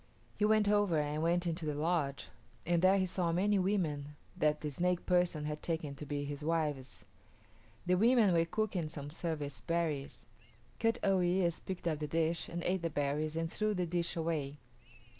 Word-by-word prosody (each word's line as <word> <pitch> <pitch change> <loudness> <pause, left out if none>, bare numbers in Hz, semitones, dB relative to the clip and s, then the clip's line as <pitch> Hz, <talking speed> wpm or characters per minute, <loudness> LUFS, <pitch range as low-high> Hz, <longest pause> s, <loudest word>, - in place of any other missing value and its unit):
He 210 - +1
went 215 -1 +4
over 205 -5 +3
and 150 +1 -1
went 175 +2 +1
into 170 0 -2
the 150 - -1
lodge, 150 -3 -1 0.4
and 170 0 +2
there 190 +2 +5
he 190 - +2
saw 180 -2 -1
many 195 +4 +2
women 155 -7 -1 0.2
that 150 0 +1
the 150 - -3
snake 175 +4 0
person 175 -4 +1
had 150 0 -4
taken 160 -4 -2
to 145 +1 -9
be 145 0 -2
his 145 +1 -5
wives. 150 -5 -2 0.8
The 180 - +2
women 220 0 +5
were 165 -1 +3
cooking 185 -3 -1
some 145 -1 -7
service 150 -4 -4
berries. 160 -5 -2 0.5
Kut 225 0 +2
o 195 -1 +3
yis´ 175 -1 +1
picked 185 -2 -4
up 155 -3 0
the 150 - -3
dish 165 +2 0
and 170 0 -4
ate 185 0 0
the 165 - -1
berries 150 +2 -1
and 165 0 -2
threw 215 -1 0
the 180 -1 0
dish 170 0 -1
away. 155 -4 -2
165 Hz, 185 wpm, -33 LUFS, 150-180 Hz, 0.8 s, there